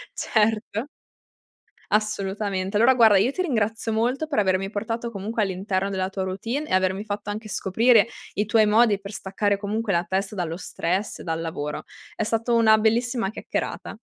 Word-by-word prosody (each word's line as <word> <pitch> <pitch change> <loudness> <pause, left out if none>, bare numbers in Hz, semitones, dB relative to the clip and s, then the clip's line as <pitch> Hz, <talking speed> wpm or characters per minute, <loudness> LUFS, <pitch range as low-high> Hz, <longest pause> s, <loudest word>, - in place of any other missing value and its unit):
certo. 220 +2 0 1.1
Assolutamente. 200 -2 -1
Allora 235 +5 +6
guarda, 225 -5 +6
io 215 +7 +3
ti 370 - -3
ringrazio 225 - -1
molto 245 +7 0
per 290 -8 0
avermi 190 -1 +1
portato 225 +3 -3
comunque 215 +3 -3
all'interno 195 0 -1
della 190 -1 -2
tua 190 -1 -3
routine 225 +10 -3
e - - -2
avermi 185 +1 +1
fatto 205 -1 -5
anche 215 +1 -5
scoprire 225 +4 +3 0.3
i 210 - +1
tuoi 220 0 +4
modi 215 -1 +4
per 200 +1 -9
staccare, 200 +1 -1
comunque 210 +2 -2
la 175 -1 +1
testa 190 +3 -1
dallo 170 -3 -2
stress, 180 +2 -3
dal 165 -1 -3
lavoro. 150 -3 -4 0.3
È 220 - -1
stato 225 +2 0
una 220 -1 +6
bellissima 230 0 +1
chiacchierata. 215 - -4
210 Hz, 160 wpm, -24 LUFS, 190-225 Hz, 1.1 s, Allora